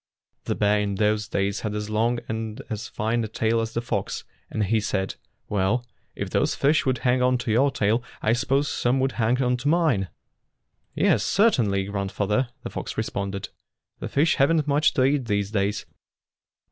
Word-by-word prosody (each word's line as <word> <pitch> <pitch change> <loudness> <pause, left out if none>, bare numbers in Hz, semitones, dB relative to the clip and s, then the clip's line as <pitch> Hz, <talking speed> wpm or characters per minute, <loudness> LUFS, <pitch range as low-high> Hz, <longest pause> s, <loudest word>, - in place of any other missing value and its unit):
The - - -1
bear 105 0 +2
in 100 -1 -1
those 105 +1 +1
days 100 0 -1
had 105 -1 -3
as 105 0 -3
long 115 +3 +1
and 110 -1 -4
as 110 +1 -4
fine 115 +1 -1
a - - -2
tail 115 +1 0
as 115 0 -4
the 115 - 0
fox, - - -2 0.3
and 110 - -1
he 110 +3 +2
said, 95 -2 -1 0.3
"Well, 105 +5 0 0.3
if - - -4
those - - +1
fish 145 0 +2
would 130 -1 +2
hang 125 0 +3
on 125 0 +3
to 120 -2 -3
your 130 +6 +4
tail, 110 -1 +1 0.2
I 110 - +2
suppose 135 +4 +1
some 125 0 +1
would 135 0 +1
hang 120 +1 +1
on 125 0 +1
to 125 - -4
mine." 150 - +2 0.9
"Yes, - - +3
certainly, 120 - +2
grandfather," 100 +4 -1
the - - -5
fox - - -5
responded. 100 0 -3 0.5
"The - - -5
fish 150 +4 +2
have 135 +3 +4
n't 155 -3 +1
much 145 +2 +3
to 130 - +3
eat 135 -1 +2
these 100 -2 -1
days. 100 -1 -1
115 Hz, 185 wpm, -25 LUFS, 105-130 Hz, 0.9 s, your